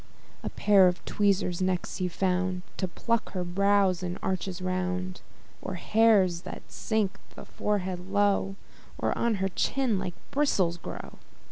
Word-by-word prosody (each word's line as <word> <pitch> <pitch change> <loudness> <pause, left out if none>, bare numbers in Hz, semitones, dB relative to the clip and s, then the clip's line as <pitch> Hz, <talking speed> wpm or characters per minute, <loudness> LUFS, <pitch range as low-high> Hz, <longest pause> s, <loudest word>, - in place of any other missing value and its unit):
A - - -3
pair 200 -3 +5
of 180 0 -1
tweezers 195 -3 +1
next 185 -1 -1
he 185 - 0
found, 180 0 0
To 185 - -1
pluck 230 +5 -1
her 185 -2 -1
brows 195 0 +2
in 180 0 -3
arches 185 -1 -2
round; 185 - -2 0.4
Or 190 - -4
hairs 195 -3 +4
that - - -8
sink 215 -3 -1 0.2
the - - -9
forehead 185 -3 -2
low, 200 -1 +2 0.4
Or - - 0
on 235 -2 +1
her 195 0 0
chin 240 +2 0
like 180 - -4 0.2
bristles 195 -12 +2
grow. - - -8
185 Hz, 145 wpm, -28 LUFS, 180-205 Hz, 0.4 s, pair